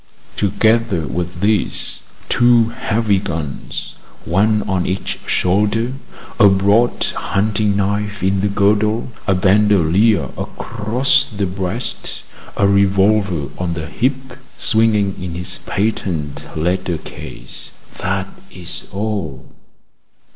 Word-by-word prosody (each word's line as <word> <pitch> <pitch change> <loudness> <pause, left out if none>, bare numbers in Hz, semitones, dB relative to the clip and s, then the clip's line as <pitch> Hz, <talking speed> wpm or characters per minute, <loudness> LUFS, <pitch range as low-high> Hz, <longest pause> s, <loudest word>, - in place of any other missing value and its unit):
Together 110 -3 +2
with 90 +1 -4
this, 105 -1 0 0.3
two 120 -1 +4
heavy 110 -3 0
guns, 80 -6 -5 0.3
one 105 +5 +2
on 95 -2 -1
each 95 +1 -3
shoulder, 105 +6 +1 0.5
a 100 -3 +8
broad 100 +5 +3
hunting 105 0 0
knife 100 0 -1
in 95 0 +2
the 100 - +2
girdle, 105 +3 +2 0.2
a 95 - +3
bandolier 100 +1 +3
across 125 +5 0
the 100 -2 -2
breast, 95 +5 -4 0.3
a 100 - +4
revolver 100 -5 +2
on 90 -2 -2
the 80 -1 -4
hip, 130 - -2 0.2
swinging 110 -3 +2
in 90 -2 -5
its 90 +1 -2
patent 90 -8 -2
leather 90 +1 0
case - - -8 0.3
that - - -1 0.2
is 90 -1 -3
all. 95 -10 -4
100 Hz, 105 wpm, -18 LUFS, 90-110 Hz, 0.5 s, a